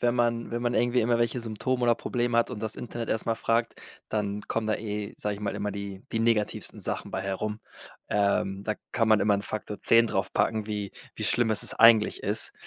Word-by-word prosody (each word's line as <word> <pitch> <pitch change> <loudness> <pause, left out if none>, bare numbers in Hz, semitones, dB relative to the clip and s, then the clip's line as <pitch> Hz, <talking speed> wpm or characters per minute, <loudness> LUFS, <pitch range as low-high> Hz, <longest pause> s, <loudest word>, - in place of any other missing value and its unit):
wenn 120 0 +2
man 120 -1 0
wenn 120 0 -2
man 120 0 0
irgendwie 120 +1 +3
immer 120 +1 +2
welche 120 +1 0
Symptome 120 +3 -2
oder 120 - +5
Probleme 120 0 -1
hat 115 - +3
und 115 -4 -5
das 110 -1 -4
Internet 120 -1 -5
erst 110 - -1
mal 115 - +1
fragt, 115 +1 0 0.4
dann 105 -1 -1
kommen 115 -1 -1
da 110 - +2
eh, 105 -1 -4
sage 105 -1 -2
ich 100 - -10
mal, 100 - -2
immer 105 - -2
die 100 -1 -6
die 115 - 0
negativsten 115 -2 0
Sachen - - -4
bei 95 - -3
herum. 100 +2 -3 0.5
Ähm, 100 -1 +1
da 110 0 0 0.2
kann 115 -1 +2
man 110 -2 +5
immer 105 +1 +3
'n 100 - 0
Faktor 105 0 -5
10 115 0 +5
draufpacken, 105 +2 0
wie 105 -2 -4 0.2
wie - - -4
schlimm 120 -1 +2
ist 110 - +2
es - - -1
eigentlich 115 -2 +5
ist. - - -2
110 Hz, 225 wpm, -27 LUFS, 105-115 Hz, 0.5 s, oder